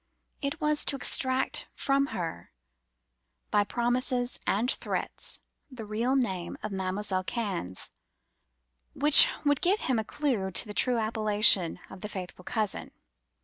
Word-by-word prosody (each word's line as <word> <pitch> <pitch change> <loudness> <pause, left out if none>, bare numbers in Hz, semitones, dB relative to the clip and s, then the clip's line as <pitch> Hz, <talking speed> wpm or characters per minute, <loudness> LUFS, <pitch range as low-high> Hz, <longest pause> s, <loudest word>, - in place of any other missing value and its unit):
It 280 -1 -3
was 300 0 0
to - - +5
extract 260 -1 0
from 275 0 0
her, 165 -8 -6 1.0
by 205 - +3
promises 245 +2 -1
and 225 +6 +1
threats, - - -2 0.3
the 250 -5 -9
real 230 +5 -1
name 190 -10 -2
of 215 - -4
Mam'selle 190 0 -2
Cannes, 190 - -4 1.0
which 295 +1 +9 0.2
would 290 -1 +2
give 390 +4 +1
him 255 -4 0
a - - -2
clue 235 -7 -2
to 190 - +4
the 210 - -7
true 250 +3 +2
appellation 215 -5 +3
of 190 - -12
The 210 - -5
Faithful 180 -2 -8
Cousin. 215 -2 -2
220 Hz, 135 wpm, -28 LUFS, 195-260 Hz, 1.0 s, which